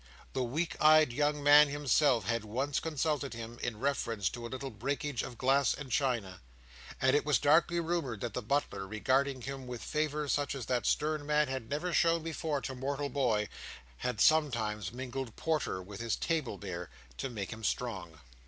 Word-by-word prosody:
The 130 - -1
weak 150 +8 -1
eyed 155 -4 +6
young 145 +2 0
man 145 +1 +8
himself 140 -5 +2
had 115 0 0
once 130 +7 -1
consulted 150 -4 -1
him, 115 +1 -8
in 115 -3 -3
reference 115 -7 0
to 120 0 -6
a - - -11
little 130 +1 -5
breakage 135 +4 -2
of 120 - -7
glass 135 +1 +3
and 145 -3 -8
china. 115 -9 0 0.6
And 130 +1 +4
it 145 - +3
was 150 -1 +3
darkly 170 +4 +4
rumoured 165 - -2
that 120 - -3
the 125 - -2
butler, 120 -5 -1
regarding 130 +5 0
him 135 -1 -6
with 125 -2 -6
favour 150 -1 -1
such 145 0 0
as 130 -4 -5
that 125 0 0
stern 155 0 +1
man 150 -1 +2
had 130 -4 -4
never 160 +5 -2
shown 165 -2 +3
before 160 -3 -2
to 135 - -4
mortal 140 +2 -3
boy, 120 -7 +1 0.5
had 125 - -3
sometimes 115 - +2
mingled 130 -1 -5
porter 155 - -1
with 100 +2 -9
his 115 -1 0
table 155 -11 -1
beer 90 -4 -6 0.3
to 135 - -3
make 105 -3 -5
him 110 +1 -11
strong. 95 -8 -3
135 Hz, 180 wpm, -32 LUFS, 115-150 Hz, 0.6 s, man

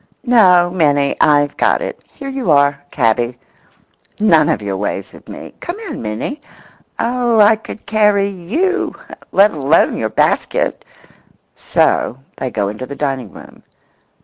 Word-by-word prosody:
No, 180 -8 +5
Minnie, 145 -5 +1
I've 145 -1 +3
got - - +2
it; - - -6
here 275 - -9
you 270 -7 -3
are, 145 -1 +3
cabby—none 125 - -1
of - - +1
your 100 -2 -4
ways 100 +2 -4
with - - -15
me. - - -10
Come 345 +3 -6
in, 425 - -6
Minnie. 115 - -5 0.6
Oh, 240 -1 +1
I 210 +1 +6
could 220 0 -11
carry 210 -1 +2
you, 250 - -2 0.4
let 205 +2 +5
alone 145 +1 +2
your 110 - -2
basket!" 110 - 0 0.7
So 125 - 0 0.2
they 130 - -3
go 105 -4 -2
into 110 +5 -6
the 140 - -7
dining 135 -7 -3
room. - - -14
165 Hz, 140 wpm, -16 LUFS, 130-215 Hz, 0.7 s, I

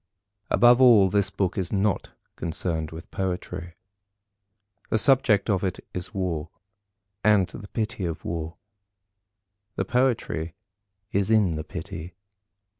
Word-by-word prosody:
Above 120 +1 +6
all, 110 -7 +7
this 100 -1 +2
book 95 -1 -1
is 90 -2 -3
not 100 -1 0 0.3
concerned 80 -1 -3
with 80 +3 -10
Poetry. 90 -2 -4 1.2
The - - +2
subject 110 -5 +4
of 100 -4 +1
it 95 - -2
is 90 +1 -5
War, 85 -6 -2 0.7
and 105 -2 +5
the 100 - -10
pity 110 -1 -3
of 80 -2 -5
War. 80 0 -4 1.2
The 95 - -1
Poetry 110 -9 0 0.6
is 100 0 +1
in 105 -7 +3
the 80 - -4
pity. 80 +2 -7
95 Hz, 120 wpm, -25 LUFS, 85-105 Hz, 1.2 s, all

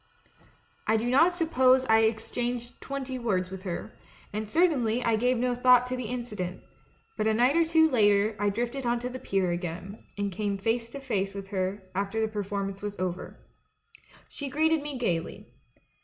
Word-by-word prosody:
"I 220 - +4
do 225 +2 -1
not 325 +7 +5
suppose 260 -6 +3
I 220 -2 +5
exchanged 235 +2 -1
twenty 270 -2 -4
words 185 -6 -1
with 190 -1 -7
her, 180 -3 -5 0.4
and 215 0 -3
certainly 255 -8 +2
I 230 - +2
gave 250 +3 +2
no 250 +1 +1
thought 250 0 +5
to 250 0 -3
the 250 -1 -4
incident; 210 -7 -4 0.5
but 215 - +1
a 220 - +3
night 250 +5 +3
or 335 - +5
two 320 0 +4
later 210 -5 +3
I 205 0 +2
drifted 240 +5 -2
on 240 0 +2
to 250 - -3
the 255 +1 -7
pier 190 -5 0
again, 175 +3 -5
and 200 -1 -1
came 200 +1 -2
face 230 +3 -1
to 280 - -7
face 200 -7 -2
with 195 -1 -7
her 190 0 -2
after 200 +3 -2
the 220 - +2
performance 200 -2 -4
was 205 0 -5
over. 180 0 -4 0.9
"She 285 -1 -6
greeted 315 +2 +2
me 290 -2 -5
gaily. 175 -9 -2
225 Hz, 180 wpm, -28 LUFS, 200-255 Hz, 0.9 s, not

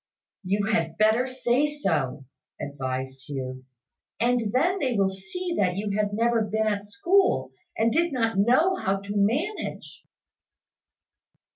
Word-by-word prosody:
"You 200 +2 0
had 165 -7 0
better 220 +4 +3
say 255 +2 +1
so," 150 - -1 0.3
advised 130 -1 -4
Hugh; 130 -2 -5 0.5
"and 235 -2 +1
then 350 - +2
they 255 -6 0
will 195 -2 +2
see 340 - -5
that 180 -2 +1
you 200 0 -2
had 210 -1 0
never 230 +2 +2
been 220 +1 0
at 205 -1 -1
school, 385 - +2 0.3
and 230 +1 +3
did 335 +4 +2
not 225 -5 0
know 255 - +4
how 195 - 0
to 200 +1 -6
manage." 275 - -1
215 Hz, 135 wpm, -26 LUFS, 190-255 Hz, 0.5 s, know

